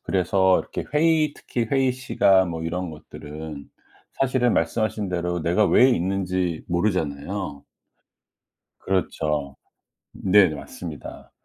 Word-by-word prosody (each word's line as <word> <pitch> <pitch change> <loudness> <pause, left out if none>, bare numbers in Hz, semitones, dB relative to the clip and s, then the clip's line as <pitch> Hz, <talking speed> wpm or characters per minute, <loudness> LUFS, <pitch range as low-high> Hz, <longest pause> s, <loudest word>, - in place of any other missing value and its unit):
그래서 95 0 +2
이렇게 - - -6
회의 155 -1 +3
특히 120 -2 -3
회의시간 125 -8 +2
뭐 80 -1 -4
이런 90 +1 -3
것들은 75 -1 -9 0.4
사실은 130 -3 +1
말씀하신대로 90 -2 -1
내가 90 +6 +2
왜 125 +9 +6
있는지 90 -4 -1
모르잖아요. 85 -3 -2 1.2
그렇죠. 75 -7 -2 0.6
네, 95 -1 +4
맞습니다. 75 0 -8
90 Hz, 250 characters per minute, -24 LUFS, 80-105 Hz, 1.2 s, 왜